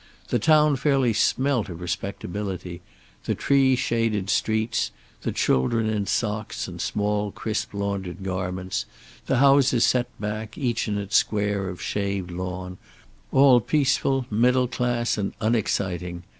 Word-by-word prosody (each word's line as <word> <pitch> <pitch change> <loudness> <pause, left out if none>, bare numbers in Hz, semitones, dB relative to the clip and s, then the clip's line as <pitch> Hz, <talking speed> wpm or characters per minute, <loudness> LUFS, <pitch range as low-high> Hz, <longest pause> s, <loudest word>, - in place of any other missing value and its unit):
The 120 - +1
town 150 +3 +4
fairly 135 -3 +2
smelt 130 0 +1
of 85 -1 -7
respectability; 90 0 -5 0.4
the - - 0
tree 135 -2 +3
shaded 115 -5 0
streets, 110 +1 0 0.3
the - - -2
children 110 - +1
in 105 -2 -1
socks 110 -1 -2
and - - -7
small 105 0 -1
crisp 110 +2 -3
laundered 100 -2 -4
garments, 95 0 -3 0.4
the 135 - +2
houses 135 -2 +5
set 125 -1 +2
back, 110 +1 -5
each 120 -4 -1
in 105 -1 -1
its 100 0 +1
square 100 -2 0
of 90 - -7
shaved 100 -3 -2
lawn, 90 +1 -5 0.5
all 135 -2 +6
peaceful, 135 0 +1
middle 125 +4 +3
class 120 -2 -1
and 100 - -2
unexciting. 90 -6 -1
105 Hz, 130 wpm, -24 LUFS, 95-125 Hz, 0.5 s, all